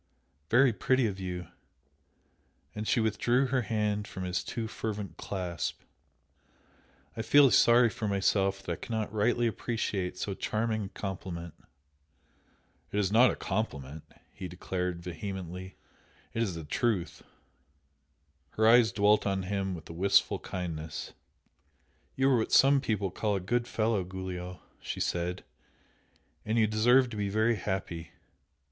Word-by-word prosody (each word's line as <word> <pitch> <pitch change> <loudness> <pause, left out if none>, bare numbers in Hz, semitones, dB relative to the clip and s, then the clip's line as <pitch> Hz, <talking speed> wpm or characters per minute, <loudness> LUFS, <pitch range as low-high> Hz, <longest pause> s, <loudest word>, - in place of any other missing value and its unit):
"Very 125 +1 +5
pretty 130 +5 +2
of 100 -3 -2
you!" 90 -2 -5 1.3
and 105 0 -5
she 125 - +3
withdrew 115 +4 +2
her 130 0 +1
hand 105 -2 -1
from 95 - -6
his 90 0 -1
too 115 -2 -4
fervent 105 -6 -5
clasp, 90 -4 -4 1.3
"I - - -3
feel 135 +3 +6
sorry 120 0 +6
for 115 -3 -4
myself 95 -1 +1
that 90 - -4
I - - 0
cannot 110 -3 -4
rightly 120 +3 +2
appreciate 105 -5 -2
so 100 - -3
charming 110 +1 -1
a - - -7
compliment!" 90 -5 -6 1.4
"It - - -2
is 100 -2 +1
not 120 +4 +6
a - - -2
compliment" 80 -8 -3 0.3
he 95 - -6
declared, 90 -1 -4
vehemently; 90 +1 -6 0.6
"It 115 - -1
is 95 -7 -1
a 80 - -7
truth!" 95 +2 -1 1.4
Her 110 0 +4
eyes 115 -2 +6
dwelt 105 +1 +3
on 95 -1 0
him 95 -1 -2
with 80 -2 -10
a - - -8
wistful 95 +4 +3
kindness. 80 -4 -5 1.0
"You 135 +1 +3
are 130 - +5
what 110 - -1
some 135 0 +6
people 105 -7 -1
call 105 +2 -1
'a - - 0
good 120 +6 -1
fellow,' 110 -4 0
Giulio!" 90 -1 -6 0.2
she - - -5
said 90 +1 -2 1.0
"And 110 +2 -1
you 110 - +5
deserve 120 +4 +4
to 110 - -6
be 100 -1 -1
very 110 +3 +2
happy. 85 -4 -4
100 Hz, 140 wpm, -30 LUFS, 90-115 Hz, 1.4 s, feel